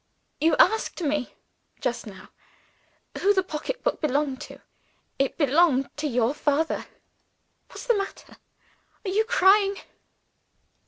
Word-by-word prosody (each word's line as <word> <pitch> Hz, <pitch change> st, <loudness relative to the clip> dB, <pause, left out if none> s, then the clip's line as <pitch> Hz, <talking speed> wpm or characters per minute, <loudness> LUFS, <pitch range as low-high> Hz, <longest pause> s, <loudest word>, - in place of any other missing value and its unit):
"You 315 Hz, +1 st, +3 dB
asked 445 Hz, -2 st, +3 dB
me, 295 Hz, -4 st, -2 dB, 0.4 s
just 240 Hz, -1 st, -3 dB
now, 190 Hz, -3 st, -12 dB, 0.9 s
who 405 Hz, +1 st, +3 dB
the 375 Hz, -, +2 dB
pocketbook -, -, -3 dB
belonged 285 Hz, -2 st, 0 dB
to. -, -, -10 dB, 0.6 s
It 275 Hz, -1 st, 0 dB
belonged 290 Hz, -2 st, +2 dB
to 300 Hz, +1 st, -2 dB
your 245 Hz, -1 st, +1 dB
father. 300 Hz, +2 st, -1 dB, 0.8 s
What's -, -, -10 dB
the 485 Hz, -, +3 dB
matter? 395 Hz, -1 st, -6 dB, 0.7 s
Are 380 Hz, -, -1 dB
you 435 Hz, +3 st, +2 dB
crying?" 395 Hz, -2 st, +4 dB
305 Hz, 115 wpm, -25 LUFS, 275-395 Hz, 0.9 s, crying